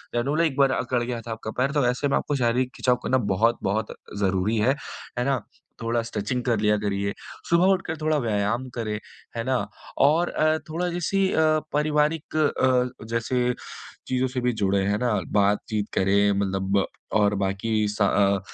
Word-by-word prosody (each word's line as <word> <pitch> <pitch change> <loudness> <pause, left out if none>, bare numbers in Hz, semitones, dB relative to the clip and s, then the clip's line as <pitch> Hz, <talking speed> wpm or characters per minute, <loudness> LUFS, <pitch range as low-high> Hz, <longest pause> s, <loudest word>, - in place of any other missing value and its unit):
जनूले 145 +8 +2
एक 140 -3 -6
बार 135 -1 +4
अकड़ 125 -1 0
गया 120 -1 -3
था 115 - -8
आपका 110 -1 -5
पैर, 135 +2 +2
तो 145 -3 +1
ऐसे 125 +3 0
में - - +2
आपको 145 - -1
शारीरिक 125 0 +1
खिंचाव 125 -1 +2
करना 130 - +2 0.2
बहुत-बहुत 110 0 0 0.2
ज़रूरी 100 +2 +1
है, 125 +6 +3 0.4
है 125 - 0
ना। 135 -3 +1 0.4
थोड़ा 115 +1 0
स्ट्रेचिंग 115 +2 -3
कर 120 -4 +1
लिया 105 0 +3
करिए, 100 -1 -1 0.4
सुबह 170 +2 +4
उठकर 180 -4 -3
थोड़ा 155 0 +2
व्यायाम 110 +4 0
करें, 110 -3 -2 0.4
है 115 - -1
ना 130 +2 0 0.5
और 160 +5 +4
अ, 155 0 +2
थोड़ा 175 +3 -1
जैसे 175 +3 -1
अ, - - -1 0.4
पारिवारिक 150 +1 0
अ, 130 -5 +1
जैसे 125 +2 0 0.5
चीज़ों 130 0 +1
से 125 0 -3
भी 125 0 +2
जुड़े, 100 0 +2
हैं 100 +1 +1
ना, 120 -3 +1 0.2
बातचीत 105 +1 +1
करें 100 +2 +3
मतलब 95 0 0 0.4
और 105 0 +3
बाकी 105 +2 0
स 105 +1 -5
अ, 100 0 +3
120 Hz, 170 wpm, -25 LUFS, 105-135 Hz, 0.5 s, बार